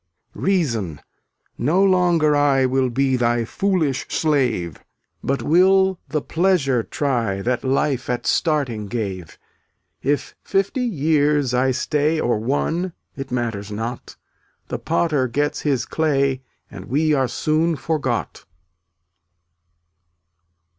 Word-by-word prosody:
312 195 0 +1
Reason, 110 - -2 0.6
no 165 +10 +2
longer 175 -5 +3
I 140 -2 +3
Will 130 0 +1
be 135 +2 +1
thy 120 -1 +1
foolish 165 - -1
slave, 125 - 0 0.4
But 135 +1 -1
will 190 +3 +4
the 150 -2 -1
pleasure 160 -8 +1
try 115 -7 -1
That 125 0 -1
life 135 0 0
at 120 -1 -2
starting 135 - 0
gave. 95 -6 -5 0.6
If 145 +2 -1
fifty 195 +6 0
years 150 - +1
I 130 +1 +2
stay 150 +4 0
Or 120 -6 +1
one, 160 +9 -1 0.2
it 135 -1 -6
matters 115 -5 -3
not; 115 +4 -5 0.5
The - - -3
Potter 155 -5 +1
gets 145 +5 -1
his 135 -6 0
clay 140 -4 0 0.3
And - - -9
we 155 +4 +1
are 135 -3 +2
soon 160 +5 0
forgot. 140 -7 -3
140 Hz, 115 wpm, -21 LUFS, 120-160 Hz, 0.6 s, will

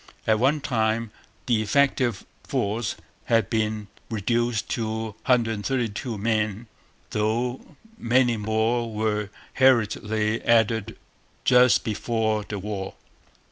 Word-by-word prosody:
At 110 -1 +3
one 140 +5 +2
time 115 -3 0 0.3
the 115 -4 +2
effective 125 -1 +1 0.2
force 110 +3 -1 0.3
had 115 -4 +2
been 110 -1 -1 0.2
reduced 115 +1 0
to 110 -1 -2 0.2
132 115 -1 0
men; 110 0 -1 0.5
though 115 +4 -1 0.4
many 120 0 +3
more 110 +2 0
were 105 -1 -1 0.2
hurriedly 110 -3 +2
added 115 -2 +2 0.5
just 125 -3 +5
before 110 0 -1
the 100 0 -6
war. 100 -1 -5
110 Hz, 100 wpm, -25 LUFS, 105-120 Hz, 0.5 s, just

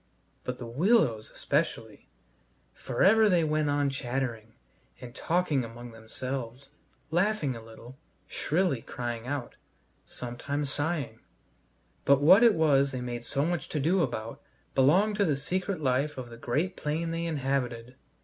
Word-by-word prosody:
But 125 0 -4
the 120 - -7
willows 125 - +2
especially: - - -2 0.6
for 120 - -2
ever 215 +2 +6
they 175 -3 +3
went 155 -1 +1
on 145 -1 +1
chattering 120 -4 -4 0.4
and 120 -1 -10
talking 160 -5 0
among 120 +1 -9
themselves, 125 +3 -6 0.4
laughing 175 - +1
a 115 - -8
little, 115 +4 -13 0.3
shrilly 160 -6 0
crying 120 0 -5
out, 140 -3 -4 0.5
sometimes 135 +4 -4
sighing 145 -7 -2 0.8
but 140 -1 +5
what 180 +9 +7
it 230 -4 +6
was 140 -3 +3
they 130 - -4
made 120 -1 -5
so 140 +4 0
much 175 0 -2
to 150 - -2
do 170 +6 +2
about 115 -6 -3 0.3
belonged 185 +11 +4
to 200 - +3
the 150 -5 +1
secret 185 +6 -2
life 135 +2 0
of 125 -2 -7
the - - -8
great 155 +11 -1
plain 160 +2 -2
they 165 0 -2
inhabited. 130 -5 -2
140 Hz, 145 wpm, -28 LUFS, 120-165 Hz, 0.8 s, what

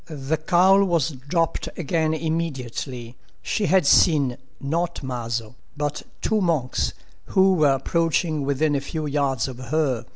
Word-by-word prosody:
The 150 -1 -2
cowl 185 +5 +4
was 170 -6 +1
dropped 155 +5 -2
again 160 -1 0
immediately. 135 -6 -4 0.3
She 205 -3 -1
had 185 0 +3
seen, 140 -5 +4 0.2
not 165 +3 -2
Maso, 120 -3 -4 0.2
but—two 150 +8 -2
monks, 155 -9 0 0.3
who 190 0 +4
were 150 -6 +4
approaching 165 +2 0
within 140 +2 +1
a 140 - 0
few 155 +2 -4
yards 140 -4 0
of 130 -2 -8
her. 130 -2 -1
150 Hz, 130 wpm, -23 LUFS, 135-165 Hz, 0.3 s, cowl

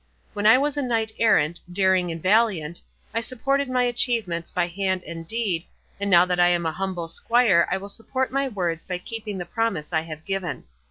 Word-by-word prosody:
When 205 +1 +1
I 225 - +8
was 290 +1 0
a - - +1
knight 225 -4 0
errant, 170 -7 +3
daring 185 -1 +2
and 165 - -5
valiant, 185 -6 +2 0.3
I 230 - 0
supported 275 +4 -1
my 250 -1 +2
achievements 225 -8 0
by 175 -1 0
hand 185 +1 -2
and 165 -1 -8
deed, 195 -6 -2 0.3
and 200 0 -1
now 175 -1 +7
that 180 -1 -1
I 175 - +6
am 175 -1 +1
a 160 - 0
humble 180 -1 -4
squire 215 -2 +3
I 190 - 0
will 195 +1 -8
support 245 +5 -3
my 275 +1 0
words 175 -8 -2
by 180 -1 -3
keeping 215 +1 -6
the 175 - -4
promise 220 -9 -2
I 160 - +2
have 155 -1 -9
given. 190 -7 -3
195 Hz, 205 wpm, -24 LUFS, 170-230 Hz, 0.3 s, I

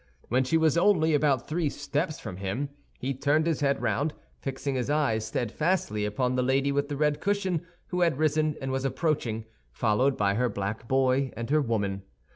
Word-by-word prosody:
When 130 +3 +3
she 145 +5 +2
was 160 +1 +3
only 170 -5 +4
about 140 -4 +2
three 160 -1 0
steps 145 +3 -2
from 90 - -7
him, 100 +9 -2 0.3
he 135 +2 -2
turned 145 +4 +2
his 165 -2 0
head 140 -1 +1
round, 140 +7 0 0.2
fixing 135 +1 -3
his 130 0 -1
eyes 140 -8 +1
steadfastly 120 - 0
upon 125 +5 0
the 125 - +1
lady 135 +2 +2
with 140 +1 0
the 145 - -3
red 150 0 +1
cushion, 190 -4 0 0.2
who 180 0 -1
had 170 -6 +3
risen 155 0 +2
and 135 -1 -3
was 130 0 -1
approaching, 130 -6 -1 0.3
followed 115 - +2
by 100 -1 +2
her 125 +4 +1
black 100 +3 -4
boy 130 0 +2
and 115 +3 -4
her 155 0 +4
woman. 100 -6 -1
140 Hz, 190 wpm, -28 LUFS, 120-155 Hz, 0.3 s, only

